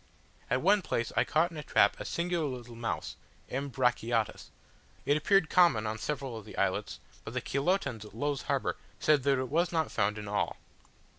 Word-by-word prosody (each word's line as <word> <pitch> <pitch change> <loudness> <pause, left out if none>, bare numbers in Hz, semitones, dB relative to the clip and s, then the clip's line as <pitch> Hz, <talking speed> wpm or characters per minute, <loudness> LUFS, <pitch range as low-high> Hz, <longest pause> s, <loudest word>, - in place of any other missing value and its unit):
At 125 +3 +1
one 200 +3 +5
place 115 -9 -2
I - - +4
caught 165 +3 +2
in 165 - -9
a 150 - -5
trap - - +3
a - - -5
singular 170 -2 -1
little 120 -3 -7
mouse 115 0 -3 0.3
(M. 140 +2 -3
brachiotis); 120 -4 0 0.6
it 145 - +3
appeared 185 +3 +3
common 170 -12 +4
on 110 +1 -3
several 135 -4 -3
of 110 - -7
the 105 - -11
islets, - - -1 0.2
but - - -8
the - - +1
Chilotans 140 - 0
at 105 -1 -13
Low's 145 +3 -1
Harbour - - -1 0.2
said 150 -2 +4
that 140 +1 +2
it 130 -1 -2
was 170 +3 +1
not 160 -2 0
found 105 0 +1
in 105 -1 -6
all. 105 0 -1
135 Hz, 195 wpm, -30 LUFS, 115-160 Hz, 0.6 s, one